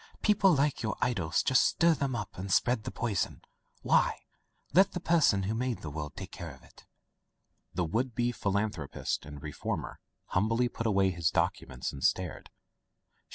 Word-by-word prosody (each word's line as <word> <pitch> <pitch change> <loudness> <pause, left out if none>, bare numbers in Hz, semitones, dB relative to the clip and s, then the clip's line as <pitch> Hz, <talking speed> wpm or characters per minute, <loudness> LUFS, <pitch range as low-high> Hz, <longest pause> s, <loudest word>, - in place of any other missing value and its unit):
Peo 210 - +5
ple 195 -4 +4
like 145 0 +1
your 110 -1 -2
idol 105 -10 0
just 125 +10 +3
stir 170 0 +4
them 140 -4 -1
up 105 -5 -5
and 95 +1 -5
spread 120 +2 +2
the - - -3
poison. 110 -5 -2 0.4
Why? - - +3 0.5
Let 190 +4 +5
the 180 - -2
Person 160 - +3
who 100 +4 -1
made 125 +1 -2
the 80 - -5
world 75 0 -5
take - - -7
care - - -7
of - - -13
it." - - -19 0.9
The 90 0 +1
would 115 +8 -1
be 120 0 +1
philanthropist 100 - -2
and 75 -1 -9
reformer 75 -2 -4 0.3
humbly 115 +6 +2
put 115 -1 -3
away 95 -3 +3
his 85 -2 0
documents 65 0 -1
and 70 - -7
stared. 90 -3 0
110 Hz, 170 wpm, -30 LUFS, 90-125 Hz, 0.9 s, Peo